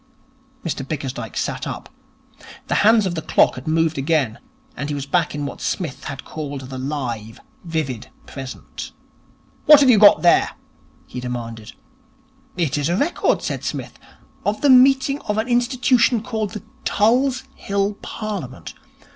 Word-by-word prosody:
Mr 150 -4 -2
Bickersdyke 135 -2 -5
sat - - -2
up. - - -6 0.8
The - - +1
hands 215 0 +5
of 185 - -1
the 160 - -3
clock - - +3
had 125 - -9
moved 160 -1 +1
again, 140 -6 0 0.4
and 140 - -4
he 145 - -2
was 140 -1 -4
back 165 +1 0
in 145 -1 -3
what 140 - -7
Psmith 155 -8 -3
had 140 -1 -6
called 145 -3 -6
the 130 0 -7
live, 125 -6 -4 0.2
vivid 155 -9 -3 0.2
present. 135 -1 -8 0.7
'What 300 -1 +10
have 265 -2 +6
you 220 - +5
got 205 -3 +7
there?' 175 - +4 0.5
he 125 - -7
demanded. 120 -3 -6 0.8
'It 155 -5 0
is 145 +2 0
a 175 - +1
record,' 315 +9 +1
said - - -3
Psmith, - - -5 0.4
'of 205 +1 -1
the 285 - +5
meeting 270 +2 +5
of 210 - 0
an 220 +2 0
institution 245 -1 +2
called 220 -4 -3
the 210 - -7 0.2
Tulse 250 +5 +2
Hill 200 +1 -1
Parliament. 195 - -6
165 Hz, 155 wpm, -21 LUFS, 135-220 Hz, 0.8 s, What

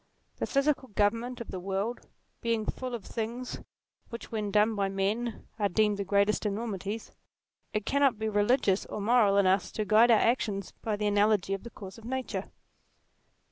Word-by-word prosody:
The - - -2
physical 275 -1 +1
government 230 +4 0
of 235 - -7
the 185 - -4
world 195 +6 -3 0.3
being 230 -2 0
full 255 +1 -3
of 225 - -7
the - - -12
things 235 +3 -4 0.5
which 235 0 -8
when 215 -2 -2
done 210 +2 +3
by 200 -2 0
men 210 +4 -2
are 205 -1 +2
deemed 210 +2 +2
the 200 - -1
greatest 200 +2 +2
enormities, 210 0 -3 0.6
it 215 -2 -2
cannot 275 -4 +3
be 220 0 -2
religious 205 -1 +2
or - - -5
moral 210 -2 +4
in 200 - +4
us 185 +1 +2
to 215 - -2
guide 220 +3 +5
our 230 - +7
actions 210 -5 0
by 220 -2 -1
the 210 0 -2
analogy 205 -1 +2
of 195 - -3
the 235 - -9
course 195 -1 -10
of 225 - -14
nature. 260 +1 -3
215 Hz, 180 wpm, -29 LUFS, 200-235 Hz, 0.6 s, our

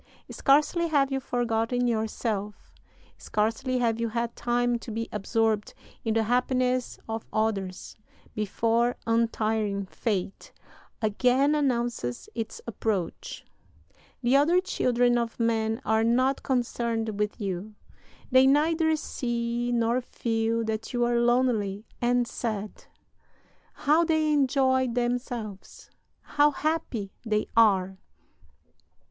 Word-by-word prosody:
Scarcely 300 +5 +3
have 280 -4 +2
you 270 - 0
forgotten 245 -1 0
yourself, 220 -2 -2 0.5
scarcely 230 +5 -1
have 230 -2 +1
you 230 0 -1
had 235 +1 -2
time 240 0 0
to 230 - -10
be 225 +1 -3
absorbed 215 0 0 0.3
in 225 -1 0
the 225 - +3
happiness 250 +1 0
of 225 0 -5
others, 195 -4 -2 0.4
before 230 +3 +1
untiring 220 -3 0
Fate 195 -1 -3 0.5
again 250 +7 +3
announces 240 - -1
its 225 -2 -5
approach. 215 -6 -3 0.8
The 245 +3 +3
other 315 +6 +5
children 245 -9 +1
of 235 0 -4
men 225 -1 +1
are 220 +1 +2
not 255 +4 +2
concerned 230 -4 -1
with 210 0 -1
you. 200 +1 -4 0.6
They 260 +1 +6
neither 315 +3 +3
see 240 -4 -2
nor 235 +1 +1
feel 230 -1 -1
that 220 +1 -4
you 240 -1 +2
are 240 0 +2
lonely 235 -4 +1 0.2
and 245 0 +2
sad. 215 -4 -5 0.9
How 305 +4 +3
they 315 -2 +2
enjoy 260 -2 +2
themselves, 240 -4 -4 0.3
how 290 0 +3
happy 290 -9 -2
they 215 -2 0
are! 190 -4 +4
235 Hz, 110 wpm, -27 LUFS, 220-255 Hz, 0.9 s, They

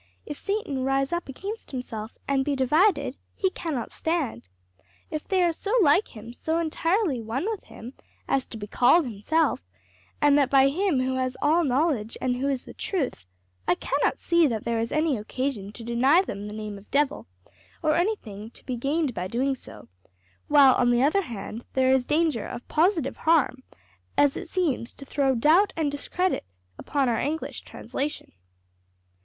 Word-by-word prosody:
If 295 - -7
Satan 395 -11 -2
rise 270 +2 +1
up 345 -4 -3
against 400 - -6
himself, 230 -4 -6
and 275 -1 +2
be 285 0 0
divided, 285 0 +2 0.2
he 380 -2 +1
cannot 300 -12 -4
stand.' 295 - -2 0.6
If 305 -1 -4
they 375 -2 +2
are 345 - +3
so 400 +6 -4
like 300 - +3
him, 230 +3 -9
so 320 +6 -2
entirely 335 - 0
one 230 - -3
with 440 -3 -4
him, 240 +4 -10 0.3
as 270 -2 +1
to 225 - -8
be 205 - -6
called 250 - +4
himself 265 +8 0 0.6
and 290 -1 +5
that 275 - +2
by 270 0 +5
Him 335 -2 +1
who 260 0 -1
has 255 0 -1
all 320 +4 +3
knowledge 265 -5 0
and 250 -1 0
who 275 +2 0
is 265 -3 -2
the - - -10
Truth 270 - -3 0.4
I 180 - +4
cannot 280 +9 0
see 340 -2 +3
that 225 -5 -2
there 235 -1 -1
is 230 0 -2
any 305 -3 +1
occasion 215 -1 -3
to 230 - -9
deny 260 +9 +4
them 205 - -6
the 210 - -7
name 210 -2 -6
of 200 - -20
devil, 290 0 0 0.6
or 305 - +3
anything 250 - -2
to - - -12
be 250 -2 -3
gained 280 +2 0
by 180 -2 -3
doing 260 +7 0
so; 260 - -11 0.6
while 280 -3 +7
on 245 -1 +2
the 240 +1 +3
other 310 +8 +3
hand 230 - -7
there 260 0 +3
is 260 -2 +1
danger 305 -7 +1
of 240 - -8
positive 320 -4 +1
harm, 315 -5 +2 0.6
as 285 -1 +4
it - - -6
seems 300 -10 -1
to 275 - -12
throw 270 -1 +1
doubt 325 - +4
and 305 -3 +1
discredit 360 +6 -1 0.4
upon 280 -2 0
our 230 -2 +1
English 315 +3 -3
translation." 290 +2 -5
275 Hz, 180 wpm, -26 LUFS, 245-320 Hz, 0.6 s, while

